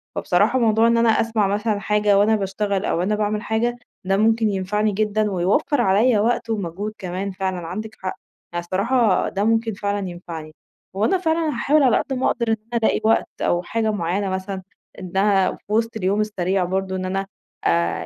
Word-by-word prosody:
فبصراحة 260 Hz, -, +2 dB
موضوع 225 Hz, -1 st, +3 dB
إن 235 Hz, 0 st, +3 dB
أنا 230 Hz, 0 st, +4 dB
أسمَع 220 Hz, -2 st, +2 dB
مثلًا 205 Hz, +1 st, 0 dB
حاجة 210 Hz, -1 st, +2 dB
وأنا 210 Hz, +2 st, +4 dB
باشتغل 200 Hz, 0 st, -1 dB
أو -, -, 0 dB
وأنا 195 Hz, +4 st, +1 dB
باعمِل 210 Hz, 0 st, -1 dB
حاجة 235 Hz, +3 st, -1 dB, 0.3 s
ده 195 Hz, +1 st, +2 dB
ممكن 220 Hz, +1 st, +3 dB
ينفعني 210 Hz, +2 st, 0 dB
جدًا، 210 Hz, +1 st, 0 dB
ويوفر 200 Hz, -, +1 dB
عليّا 215 Hz, +3 st, +3 dB
وقت 230 Hz, +2 st, 0 dB
ومجهود 205 Hz, 0 st, -3 dB
كمان، 190 Hz, +1 st, -4 dB
فعلًا 185 Hz, -3 st, -3 dB
عندِك 215 Hz, +5 st, -6 dB
حق، 185 Hz, -, -3 dB, 0.4 s
يعني 175 Hz, 0 st, -2 dB
الصراحة 210 Hz, +3 st, +1 dB
ده 195 Hz, -, -2 dB
ممكن 225 Hz, +1 st, +1 dB
فعلًا 200 Hz, -1 st, -2 dB
ينفعني. 165 Hz, -3 st, -8 dB, 0.4 s
وأنا 220 Hz, -, +2 dB
فعلًا 325 Hz, -2 st, 0 dB
هاحاول 290 Hz, +3 st, +2 dB
على 250 Hz, -4 st, +4 dB
قد 270 Hz, -, -2 dB
ما 260 Hz, 0 st, -1 dB
أقدر 235 Hz, -1 st, -1 dB
إن 225 Hz, -, +3 dB, 0.2 s
أنا -, -, +2 dB
ألاقي -, -, +2 dB
وقت 220 Hz, +1 st, +2 dB
أو 175 Hz, -, +1 dB
حاجة 220 Hz, +4 st, -1 dB
معيّنة 195 Hz, 0 st, -1 dB
مثلًا 190 Hz, +1 st, -4 dB, 0.4 s
إنها 190 Hz, +1 st, +2 dB
في -, -, -12 dB
وسط 230 Hz, +1 st, 0 dB
اليوم 200 Hz, +1 st, +1 dB
السريع، 190 Hz, -3 st, 0 dB
برضه 190 Hz, +1 st, -2 dB
إن 185 Hz, 0 st, -3 dB
أنا 195 Hz, +1 st, -2 dB, 0.4 s
آآ 85 Hz, 0 st, +1 dB
205 Hz, 185 wpm, -22 LUFS, 190-225 Hz, 0.4 s, أنا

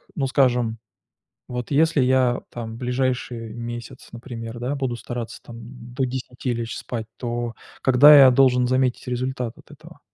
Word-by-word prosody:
ну, 135 Hz, -4 st, 0 dB
скажем, 125 Hz, -4 st, +2 dB, 0.7 s
вот 125 Hz, -1 st, -5 dB
если 160 Hz, +1 st, +3 dB
я 130 Hz, -1 st, +2 dB
там 115 Hz, -2 st, -6 dB
в -, -, -8 dB
ближайший 125 Hz, -3 st, -2 dB
месяц, 120 Hz, +2 st, -8 dB
например, 115 Hz, -1 st, -8 dB
да, 125 Hz, +4 st, -2 dB
буду 130 Hz, -4 st, -2 dB
стараться 120 Hz, 0 st, -6 dB
там 115 Hz, -, -10 dB, 0.4 s
до 130 Hz, -, 0 dB
10 125 Hz, 0 st, -4 dB
лечь 115 Hz, -1 st, -4 dB
спать, 115 Hz, -3 st, -5 dB
то 120 Hz, -1 st, -4 dB, 0.3 s
когда 145 Hz, +3 st, +8 dB
я 135 Hz, -1 st, +9 dB
должен 125 Hz, -1 st, +4 dB
заметить 130 Hz, 0 st, 0 dB
результат 125 Hz, -1 st, -3 dB
от -, -, -19 dB
этого? -, -, -15 dB
125 Hz, 155 wpm, -23 LUFS, 120-130 Hz, 0.7 s, я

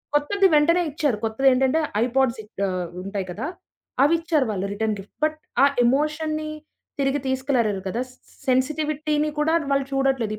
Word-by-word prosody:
కొత్తది 385 Hz, +7 st, +3 dB
వెంటనే 335 Hz, +4 st, +4 dB
ఇచ్చారు. 290 Hz, -6 st, 0 dB
కొత్తదేంటంటే 265 Hz, +5 st, +3 dB, 0.2 s
ఐపాడ్స్ 255 Hz, -1 st, +1 dB
ఇహ్ 210 Hz, -, -21 dB, 0.2 s
ఆహ్, 180 Hz, -2 st, -3 dB
ఉంటాయి 195 Hz, -1 st, -4 dB
కదా! 210 Hz, -, -4 dB, 0.6 s
అవిచ్చారు 325 Hz, -1 st, +2 dB
వాళ్ళు 195 Hz, -2 st, -2 dB
రిటర్న్ 215 Hz, +1 st, -1 dB
గిఫ్ట్. 195 Hz, -, -13 dB
బట్ 310 Hz, 0 st, -1 dB, 0.3 s
ఆ -, -, +9 dB, 0.2 s
ఎమోషన్‌నీ 305 Hz, +4 st, 0 dB, 0.5 s
తిరిగి 275 Hz, +1 st, +1 dB
తీసుకురాలేరు 255 Hz, -7 st, 0 dB
కదా! 230 Hz, +6 st, -2 dB
సి -, -, -20 dB, 0.3 s
సెన్సిటివిటీని 300 Hz, +3 st, +1 dB
కూడా 310 Hz, +2 st, +2 dB, 0.2 s
వాళ్ళు 275 Hz, -1 st, +2 dB
చూడట్లేదు. 265 Hz, -5 st, +1 dB
270 Hz, 140 wpm, -23 LUFS, 230-305 Hz, 0.6 s, ఆ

